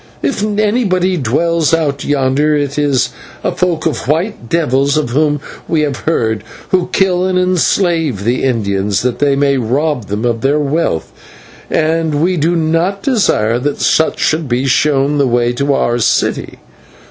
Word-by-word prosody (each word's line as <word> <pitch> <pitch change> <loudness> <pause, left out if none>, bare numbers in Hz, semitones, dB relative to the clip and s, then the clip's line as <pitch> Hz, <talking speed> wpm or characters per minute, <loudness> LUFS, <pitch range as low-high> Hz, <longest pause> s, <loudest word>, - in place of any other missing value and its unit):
If 275 - -1
anybody 205 -3 +1
dwells 165 +4 +1
out 145 -4 -2
yonder 145 +2 +1
it 145 0 -1
is 135 -4 +1 0.3
a - - 0
folk 175 -3 -1
of 155 -6 -2
white 160 - -2
devils 140 -3 +1
of 150 -6 -1
whom 150 +2 +1 0.3
we 160 -2 +1
have 145 -3 -1
heard, 110 -9 0 0.3
who 185 -2 +1
kill 185 -2 +2
and 185 -1 0
enslave 175 - +1
the 120 +4 0
Indians, 100 -5 0
that 125 -1 -1
they 145 -1 +2
may 140 0 +2
rob 130 +1 -1
them 105 +4 -3
of 115 -2 -1
their 140 +2 +2
wealth, 145 - -1 0.6
and 160 -1 0
we 175 +5 +1
do 170 +2 +1
not 165 +5 0
desire 120 - +1
that 145 +3 -2
such 160 - +2
should 155 -3 0
be 125 +2 0
shown 140 +1 +2
the 140 - +3
way 120 0 +1
to 140 +3 -1
our 120 -3 +1
city. 110 - 0
145 Hz, 160 wpm, -14 LUFS, 125-165 Hz, 0.6 s, the